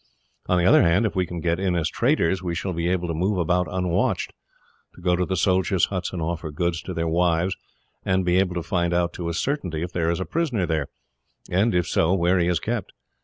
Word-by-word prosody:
On 90 - +2
the 90 - +2
other - - +6
hand, 90 +6 +3
if 105 - -2
we 90 -1 +1
can 85 -1 -5
get 85 +1 0
in 95 -2 0
as 80 -3 +1
traders 90 +2 +1
we 85 -2 -3
shall 90 +3 -3
be 85 +1 -1
able 90 -1 0
to 85 - -2
move 95 +5 0
about 90 0 +1
unwatched 90 -1 -1 0.6
to - - -14
go 90 0 +2
to 90 0 -1
the 95 - -1
soldiers' 95 -1 +2
huts 95 -1 -3
and 90 - -5
offer 80 0 -3
goods 85 +2 -1
to 90 - -6
their 85 0 -1
wives, 85 +2 +1 0.5
and 95 0 +1
be 90 +1 +3
able 90 -2 0
to 85 - -2
find 85 0 0
out, 85 0 +1
to 85 -1 -4
a - - -2
certainty, 90 - -2
if 90 - -5
there 85 -2 0
is 85 +1 0
a 95 - -2
prisoner 140 - -1
there, 80 -4 -1 0.6
and, 95 +3 +2
if 90 -1 +2
so, 85 +4 +2
where 90 +1 +2
he 85 - +2
is 90 -2 +1
kept. 115 -4 -3
90 Hz, 240 wpm, -24 LUFS, 85-95 Hz, 0.6 s, other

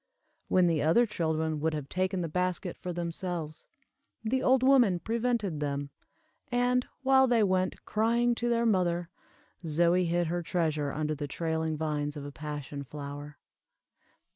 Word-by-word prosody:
When 185 -1 +4
the 165 -3 +2
other 170 +11 +4
children 160 -6 -1
would 160 +1 0
have 145 -2 -5
taken 185 +3 -1
the 170 - -2
basket 180 +2 -2
for 180 - -6
themselves, 170 -2 -4 0.6
the 255 +4 0
old 260 0 +3
woman 250 -9 +5
prevented 225 -3 -1
them; 140 -1 -3 0.6
and, 245 +1 +2 0.2
while 265 0 +5
they 235 -3 +3
went, 185 -1 0
crying, 235 +3 +2
to 240 0 -2
their 235 0 +2
mother, 175 -5 +1 0.5
Zoie 170 +3 +2
hid 175 +1 +1
her 175 +2 -1
treasure 155 -4 -1
under 155 +1 -1
the 145 -1 -4
trailing 160 +1 -2
vines 150 -1 -2
of 145 - -6
a 145 - -6
passion 145 -1 -6
flower. 145 +1 -8
170 Hz, 150 wpm, -29 LUFS, 150-215 Hz, 0.6 s, woman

